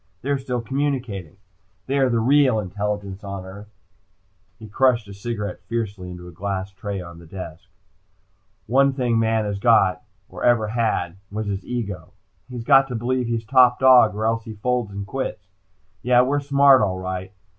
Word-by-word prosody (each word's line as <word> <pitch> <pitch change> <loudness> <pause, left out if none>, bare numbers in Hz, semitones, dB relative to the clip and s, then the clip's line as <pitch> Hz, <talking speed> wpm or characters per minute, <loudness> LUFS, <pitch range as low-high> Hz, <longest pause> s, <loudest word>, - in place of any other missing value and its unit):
They're 140 +1 0
still 125 -2 -3
communicating. 125 - -3 0.5
They 140 +1 0
are 135 -1 +3
the 120 - +1
real 130 0 +4
intelligence 100 0 -4
on 100 -1 -6
the 95 - -10
earth!" 100 +2 -11 0.9
He 110 -1 -11
crushed 120 0 +2
a 100 - -9
cigarette 105 0 -5
fiercely 105 -6 -4
into 90 0 -9
a - - -10
glass 95 +2 -4
ash - - -33
tray 100 0 -5
on 85 -1 -11
the 85 - -14
desk. 85 -3 -9 1.0
"Only 135 +3 +3
thing 120 -4 0
man 110 -1 +1
has 100 -1 -3
got, 100 -5 +3 0.3
or - - -9
ever 115 -3 +3
had, 105 -6 -1
was 110 +1 -3
his 100 -2 -3
ego. 100 -7 -5 0.4
He's 125 -2 -6
got 135 +1 +5
to 125 - -5
believe 125 +2 -1
he's 115 -1 -2
top 125 0 +5
dog, 125 -5 +6
or 110 +1 -2
else 115 0 0
he 110 - -8
folds 120 +1 -1
and 100 0 -6
quits. 130 -4 -5 0.6
Yeah, 125 0 +4
we're 140 +3 +1
smart 140 -1 +5
all 95 -3 0
right. 95 0 -5
110 Hz, 180 wpm, -22 LUFS, 100-125 Hz, 1.0 s, dog